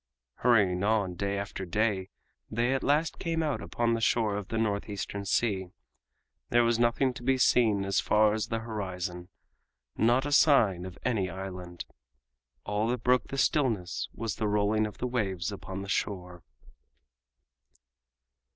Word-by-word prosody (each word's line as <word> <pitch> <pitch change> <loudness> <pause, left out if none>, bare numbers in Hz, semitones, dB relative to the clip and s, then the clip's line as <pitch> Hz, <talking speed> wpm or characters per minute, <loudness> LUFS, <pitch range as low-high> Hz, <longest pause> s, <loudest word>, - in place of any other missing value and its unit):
Hurrying 100 -7 +3
on 105 -3 +1
day 100 +3 -2
after 100 -1 -5
day 95 0 0 0.4
they 120 +4 +1
at 135 - 0
last 150 +3 +1
came 165 -1 -1
out 150 -3 -1
upon 120 -1 0
the 115 - -1
shore 110 -2 +2
of 100 -2 -4
the 115 - -3
North 105 -2 -1
Eastern 100 0 -4
Sea. 95 -2 0 0.8
There 120 0 +4
was 115 0 +2
nothing 120 +2 +2
to 120 - -10
be 130 +2 +2
seen 110 -6 +3
as 100 -1 +1
far 105 0 +3
as 110 0 -2
the 115 0 -2
horizon—not 95 - -3
a 145 - -3
sign 110 - +4
of 90 - -10
any 105 -7 0
island. 90 -1 -7 0.8
All 105 +2 0
that 120 -1 -2
broke 125 0 +3
the 135 - -5
stillness 115 - 0
was 115 -2 -4
the 110 - -1
rolling 105 +1 +2
of 105 - -11
the - - -3
waves 105 -6 -1
upon 95 -1 -6
the - - -8
shore. 90 -3 -3
105 Hz, 155 wpm, -29 LUFS, 95-120 Hz, 0.8 s, There